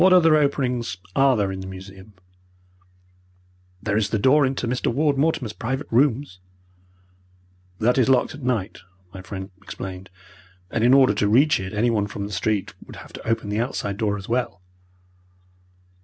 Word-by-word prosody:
"What 185 0 +6
other 165 -4 +6
openings 125 -9 0 0.2
are 135 -2 +4
there 100 -2 0
in 95 - -5
the 95 - -7
museum?" 95 +2 -11 1.7
"There 105 -2 -1
is 105 -1 +1
the 110 - 0
door 135 +6 +4
into 130 -2 -3
Mr. 125 +1 -1
Ward 145 +3 +1
Mortimer's 135 -6 0
private 130 +6 -3
rooms." 125 -5 +1 1.4
"That 120 +5 +2
is 130 - +3
locked 130 -1 +3
at 145 - -10
night," 115 -6 -2 0.3
my 95 - -8
friend 95 +1 -7
explained, 95 -1 -8 0.6
"and 115 - 0
in 125 +3 +6
order 130 -6 +5
to 105 0 0
reach 140 +6 +4
it 95 0 -5
anyone 110 -1 +1
from 100 0 -5
the 105 - -7
street 100 +1 -1
would - - -12
have - - -12
to - - -9
open 115 -2 -1
the 105 +1 -1
outside 105 -5 -3
door 105 -2 0
as 95 - -9
well." 120 -6 -2
115 Hz, 170 wpm, -23 LUFS, 100-135 Hz, 1.7 s, What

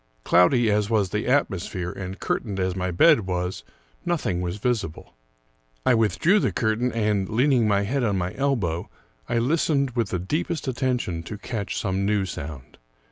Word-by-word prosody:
Cloudy 110 +6 +4
as 105 0 +1
was 105 -5 +1
the 105 - -2
atmosphere, 95 -9 0
and 95 0 -7
curtained 100 -5 -2
as 95 -1 0
my 95 -1 -2
bed 110 - +4
was, 90 -6 -2 0.4
nothing 155 - -1
was 90 +2 -3
visible. 110 -7 -3 0.7
I - - +5
withdrew 120 - +3
the - - +1
curtain, 115 +2 0
and, 105 -4 0
leaning 125 0 +3
my 100 -1 +2
head 130 +6 -1
on 105 -4 +1
my 90 0 -2
elbow, 110 -12 -1 0.4
I 120 - +1
listened 140 +1 +1
with 115 -4 -1
the 90 - -1
deepest 150 - -2
attention 125 -10 -1
to 95 +5 -7
catch 105 -1 -4
some 95 0 -1
new 100 -1 +1
sound. 75 -7 -8
105 Hz, 165 wpm, -24 LUFS, 95-125 Hz, 0.7 s, I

